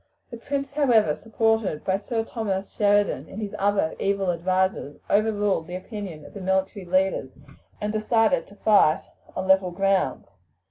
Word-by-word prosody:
The 235 Hz, -, -6 dB
prince, 275 Hz, +3 st, -3 dB
however, 240 Hz, -, +3 dB
supported 225 Hz, -7 st, 0 dB
by 190 Hz, 0 st, +1 dB
Sir 225 Hz, +3 st, -2 dB
Thomas 200 Hz, -4 st, -3 dB
Sheridan 205 Hz, -1 st, +1 dB
and 210 Hz, -, -8 dB
his 210 Hz, -2 st, -5 dB
other 200 Hz, -5 st, +1 dB
evil 195 Hz, -2 st, +1 dB
advisers, 185 Hz, -3 st, -1 dB
overruled 205 Hz, -5 st, +1 dB
the 180 Hz, -, -6 dB
opinion 185 Hz, -5 st, -7 dB
of -, -, -13 dB
the 200 Hz, -, -8 dB
military 190 Hz, +1 st, -1 dB
leaders, 185 Hz, -6 st, +1 dB, 0.5 s
and 210 Hz, 0 st, -2 dB
decided 225 Hz, +3 st, +2 dB
to 200 Hz, -, -16 dB
fight 200 Hz, -7 st, +4 dB, 0.3 s
on 190 Hz, -, -3 dB
level 190 Hz, -1 st, +4 dB
ground. 190 Hz, -6 st, 0 dB
200 Hz, 150 wpm, -25 LUFS, 185-220 Hz, 0.5 s, fight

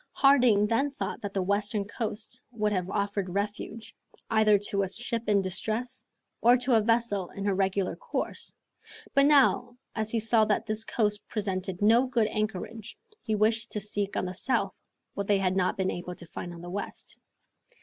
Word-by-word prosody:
Harding 250 Hz, -7 st, +5 dB
then 230 Hz, +7 st, +1 dB
thought 275 Hz, -, -5 dB
that 205 Hz, -, -4 dB
the 195 Hz, -1 st, -1 dB
western 205 Hz, +1 st, 0 dB
coast 220 Hz, +3 st, -5 dB
would 215 Hz, -3 st, 0 dB
have 185 Hz, -2 st, -1 dB
offered 200 Hz, -1 st, -1 dB
refuge, 210 Hz, +2 st, -4 dB, 0.4 s
either 215 Hz, -1 st, +5 dB
to 200 Hz, 0 st, -1 dB
a 195 Hz, -, 0 dB
ship 230 Hz, +2 st, -3 dB
in 200 Hz, -2 st, +3 dB
distress, 220 Hz, +7 st, -3 dB, 0.3 s
or 245 Hz, +2 st, +6 dB
to 250 Hz, +1 st, 0 dB
a 225 Hz, -, +5 dB
vessel 225 Hz, -4 st, +1 dB
in 200 Hz, -, -6 dB
her 200 Hz, -, +2 dB
regular 195 Hz, 0 st, 0 dB
course; -, -, -3 dB, 0.6 s
but 275 Hz, 0 st, +5 dB
now, 255 Hz, -4 st, +4 dB, 0.2 s
as 220 Hz, -1 st, -1 dB
he 230 Hz, -, +1 dB
saw 225 Hz, 0 st, +3 dB
that 210 Hz, -1 st, 0 dB
this 220 Hz, 0 st, -1 dB
coast 210 Hz, -2 st, 0 dB
presented 190 Hz, -2 st, -3 dB
no 230 Hz, +5 st, +5 dB
good 240 Hz, -3 st, +2 dB
anchorage, 215 Hz, +1 st, -4 dB, 0.2 s
he 215 Hz, -, -1 dB
wished 225 Hz, +2 st, +1 dB
to 210 Hz, -, -1 dB
seek 205 Hz, -1 st, -3 dB
on -, -, 0 dB
the 180 Hz, -, -4 dB
south 255 Hz, +8 st, 0 dB, 0.4 s
what 200 Hz, -1 st, -4 dB
they 205 Hz, -, +4 dB
had 190 Hz, -1 st, 0 dB
not 185 Hz, -1 st, +1 dB
been 190 Hz, -1 st, 0 dB
able 180 Hz, 0 st, -6 dB
to 170 Hz, -, -6 dB
find 175 Hz, +1 st, -7 dB
on 170 Hz, -1 st, -10 dB
the 175 Hz, -, -8 dB
west. 200 Hz, +2 st, -5 dB
210 Hz, 185 wpm, -28 LUFS, 195-230 Hz, 0.6 s, or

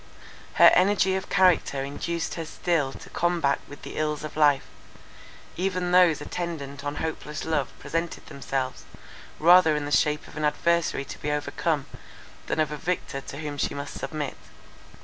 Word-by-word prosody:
Her -, -, +8 dB
energy 190 Hz, 0 st, +3 dB
of 190 Hz, 0 st, -4 dB
character 180 Hz, -7 st, +3 dB
induced 165 Hz, +5 st, -3 dB
her 165 Hz, -, -4 dB
still 160 Hz, -3 st, 0 dB
to -, -, -11 dB
combat 170 Hz, -5 st, +1 dB
with 145 Hz, -, -12 dB
the -, -, -8 dB
ills 150 Hz, -1 st, -1 dB
of 155 Hz, -, -7 dB
life; 145 Hz, -3 st, +4 dB, 0.9 s
even 185 Hz, -1 st, -1 dB
those 180 Hz, -4 st, +5 dB
attendant 145 Hz, -5 st, -5 dB
on 145 Hz, 0 st, -3 dB
hopeless 150 Hz, -2 st, -4 dB
love 145 Hz, -5 st, 0 dB
presented 165 Hz, +1 st, -3 dB
themselves, 135 Hz, -2 st, -4 dB, 0.5 s
rather 170 Hz, -1 st, +6 dB
in 150 Hz, -1 st, -2 dB
the 145 Hz, -, -5 dB
shape 150 Hz, 0 st, +2 dB
of -, -, -14 dB
an 155 Hz, -, -3 dB
adversary 160 Hz, -1 st, +1 dB
to -, -, -9 dB
be 150 Hz, -, -2 dB
overcome, 150 Hz, 0 st, -1 dB, 0.6 s
than -, -, -1 dB
of 155 Hz, -2 st, +1 dB
a 150 Hz, -, -4 dB
victor 160 Hz, -5 st, -3 dB
to 140 Hz, -, -9 dB
whom 145 Hz, -1 st, -5 dB
she -, -, -1 dB
must 140 Hz, 0 st, -5 dB
submit. 150 Hz, -3 st, -4 dB
155 Hz, 165 wpm, -26 LUFS, 145-170 Hz, 0.9 s, Her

